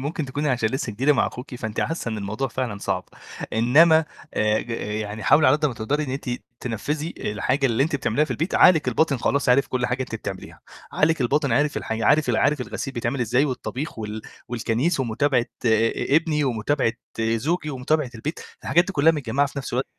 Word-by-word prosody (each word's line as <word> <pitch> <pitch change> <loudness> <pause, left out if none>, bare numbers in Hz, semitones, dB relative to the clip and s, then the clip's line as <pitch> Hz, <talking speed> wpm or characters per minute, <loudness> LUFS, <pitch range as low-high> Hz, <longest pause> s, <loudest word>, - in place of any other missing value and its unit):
ممكن 150 +3 -3
تكوني 145 +3 -2
علشان 120 -4 +1
لِسّه 130 -2 -3
جديدة 135 +8 +3
مع 140 - +2
أخوكي، 125 +1 -7
فأنتِ 110 -2 -4
حاسّة 165 -6 -2
إن 110 -1 -3
الموضوع 110 +7 -3
فعلًا 120 -4 -3
صعب، 90 -2 -2 0.5
إنما 160 +8 +5 0.3
آآ، 105 0 +2
ج 120 - -9
يعني 105 -1 -4
حاولِ 145 +3 +5
على 130 +3 +6
قد 150 0 +1
ما 130 - -3
تقدري 140 +8 -1
إن 130 - -5
أنتِ 135 -1 -4 0.3
تنفّذي، 145 +7 -3
الحاجة 120 +7 0
اللي 115 0 +1
أنتِ 145 0 0
بتعمليها 135 +3 +1
في - - -11
البيت، 165 +5 -2
عقلِك 160 -7 +5
الباطن 140 +3 +2
خلاص 140 +3 0
عرف 125 +3 +4
كل 125 -1 -1
حاجة 125 +1 -1
أنتِ 125 - -7
بتعمليها، 100 -4 -7 0.3
عقلِك 160 0 +2
الباطن 140 +2 +1
عرف 145 +5 +1
الحاج 110 0 -3
عارف 150 +1 +3
عارف 135 +4 +2
الغسيل 135 +2 -5
بيتعمل 120 +2 -2
ازاي، 125 +4 +2
والطبيخ، 135 +2 -4
وال 110 0 -5 0.3
والكنيس، 120 +7 0
ومتابعة، 125 +1 +1 0.2
ابني، 145 +7 +2
ومتابعة، 125 0 0 0.3
زوجي، 150 +9 0
ومتابعة 135 +1 0
البيت، 145 +8 -5 0.2
الحاجات 175 +2 +3
دي 200 - -5
كُلّها 160 0 +4
متجمعة 140 -1 0
في 140 0 -7
نفْس 135 - -6
الوق 125 +2 0
130 Hz, 190 wpm, -23 LUFS, 115-150 Hz, 0.5 s, على